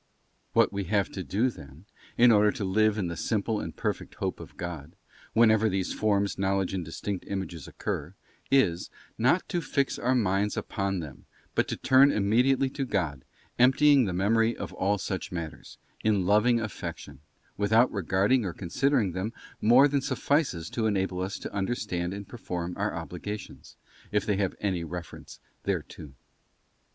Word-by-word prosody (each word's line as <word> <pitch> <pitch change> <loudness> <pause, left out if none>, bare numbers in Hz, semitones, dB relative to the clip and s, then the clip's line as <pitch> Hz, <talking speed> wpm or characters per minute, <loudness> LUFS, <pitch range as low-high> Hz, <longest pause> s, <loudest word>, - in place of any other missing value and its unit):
What - - +4
we 100 -1 -2
have 100 +1 +1
to 95 - -5
do, 110 +9 +1
then, 70 - -13 0.3
in 120 0 +7
order 105 -1 +5
to 120 - -4
live 110 +2 +2
in 100 - -1
the 85 - -4
simple 110 +3 -1
and - - -6
perfect - - -3
Hope - - -3
of - - -12
God, 85 -3 -6 0.4
whenever 110 -1 +5
these 95 -2 -1
forms, 100 -2 0
knowledge, 95 -1 0
and 95 -2 -2
distinct 90 +4 -5
images 95 -5 -5
occur, 80 +7 -4 0.3
is, 100 -11 +2 0.3
not 130 +10 +3
to 175 -2 -1
fix 140 -3 -1
our 130 +2 +1
minds 105 -2 +1
upon 100 -2 -2
them 70 -3 -10 0.3
but - - +1
to - - -3
turn 135 +2 +5
immediately 125 +6 +3
to 140 - -3
God, 85 - -2 0.4
emptying 135 +1 +5
the 95 - -2
Memory 115 +5 +2
of 95 -2 -6
all 100 +2 +1
such 95 -1 -4
matters, 85 -3 -7 0.3
in 105 -4 +2
loving 105 +5 +4
affection, 110 -9 -6 0.4
without 110 +4 +3
regarding 100 +5 +2
or 90 -4 -3
considering 115 - +1
them 95 +5 -3 0.3
more 125 +6 +7
than 140 -1 0
suffices 130 - 0
to 115 -2 0
enable 95 -3 -1
us 95 +2 -3
to - - -7
under 100 +4 0
stand 90 -6 -3
and 100 0 -7
perform 90 -7 -5
our 100 -2 -2
obligations, 90 +5 -7 0.3
if 105 -1 +1
they 105 -2 +1
have 95 -2 -1
any 95 -4 -1
reference 85 0 -8 0.2
thereto. 75 -3 -4
100 Hz, 165 wpm, -28 LUFS, 90-115 Hz, 0.4 s, in